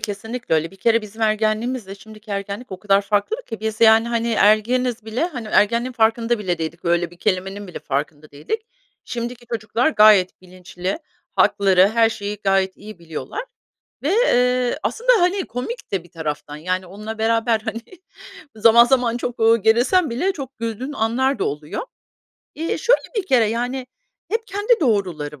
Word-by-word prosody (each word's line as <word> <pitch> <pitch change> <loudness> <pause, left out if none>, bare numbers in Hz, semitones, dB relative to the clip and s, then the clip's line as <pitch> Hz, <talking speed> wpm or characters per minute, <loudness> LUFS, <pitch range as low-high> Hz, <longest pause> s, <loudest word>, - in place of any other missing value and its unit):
kesinlikle 225 +1 -3
öyle. 160 +1 0
Bir 195 - -16
kere 230 +3 +2
bizim 215 +2 -8
ergenliğimizle 215 0 0
şimdiki 215 +1 -14
ergenlik 200 +3 -5
o 185 - -6
kadar 200 +1 +2
farklı 205 - 0
ki. 225 -3 -7
Biz, 220 0 -3
yani, 225 0 +6
hani, 235 0 -1
ergeniz 225 +3 +2
bile 225 +7 -1
hani, 250 -11 -5
o - - -9
ergenliğin 235 +4 +2
farkında 230 0 +1
bile 180 -5 -2
değildik, 165 +1 -5
böyle 170 0 +1
bir 175 - -16
kelimenin 195 +1 -2
bile 180 - -8
farkında 145 +2 -4
değildik. 435 - -4 0.4
Şimdiki 240 0 -6
çocuklar 230 +3 0
gayet 210 - +5
bilinçli. 185 - -6 0.4
Hakları, 195 -2 +4
her 225 +1 +3
şeyi 205 -1 -5
gayet 195 -1 +1
iyi 215 -2 -11
biliyorlar 170 - -6 0.6
ve, 290 - +1
eee, 250 - +2
aslında, - - +1
hani, 365 +2 +1
komik 255 - -6
de 190 -4 -1
bir 175 - -20
taraftan, 150 -3 -5
yani, 185 +4 -2
onunla 210 +4 -8
beraber, 225 0 +1
hani, 220 +1 -5 0.7
zaman 230 +2 +6
zaman 245 -2 +2
çok, 245 0 -5
eee, 225 +1 +5
gerilsen 245 - +3
bile 280 +12 0
çok 270 -4 -8
güldüğün 230 +5 -4
anlar 260 +3 0
da - - +1
oluyor. 150 +1 -4 0.7
Eee, 325 +2 -2
şöyle 485 +1 +3
bir 405 -3 -1
kere, 255 -8 +4
yani, 245 +4 -2 0.4
hep 450 +1 -2
kendi 410 +3 +1
doğruları 180 - -1
220 Hz, 165 wpm, -21 LUFS, 195-245 Hz, 0.7 s, yani